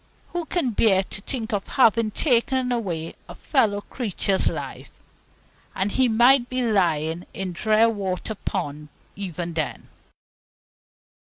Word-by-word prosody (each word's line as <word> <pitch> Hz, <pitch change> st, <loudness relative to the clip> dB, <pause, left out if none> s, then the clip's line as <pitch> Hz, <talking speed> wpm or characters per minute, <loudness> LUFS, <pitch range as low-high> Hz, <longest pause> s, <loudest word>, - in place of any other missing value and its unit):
Who 350 Hz, -1 st, -3 dB
can 320 Hz, -7 st, 0 dB
bear 200 Hz, -3 st, +4 dB
to 195 Hz, -, -7 dB
think 225 Hz, -1 st, -4 dB
of 200 Hz, -1 st, -2 dB
having 230 Hz, -3 st, +3 dB
taken 250 Hz, +1 st, +1 dB
away 175 Hz, -9 st, -2 dB, 0.2 s
a -, -, -8 dB
fellow 215 Hz, -8 st, +1 dB
creature's 200 Hz, -4 st, 0 dB
life? -, -, -6 dB, 0.9 s
And 195 Hz, +2 st, 0 dB
he 260 Hz, +3 st, +3 dB
might 240 Hz, +3 st, +5 dB
be 255 Hz, 0 st, -1 dB
lying 170 Hz, -6 st, +1 dB
in 190 Hz, -2 st, -4 dB
Drearwater 215 Hz, 0 st, +1 dB
Pond 150 Hz, -7 st, -4 dB, 0.3 s
even 175 Hz, -3 st, -5 dB
then! 155 Hz, -2 st, -3 dB
210 Hz, 120 wpm, -24 LUFS, 185-240 Hz, 0.9 s, might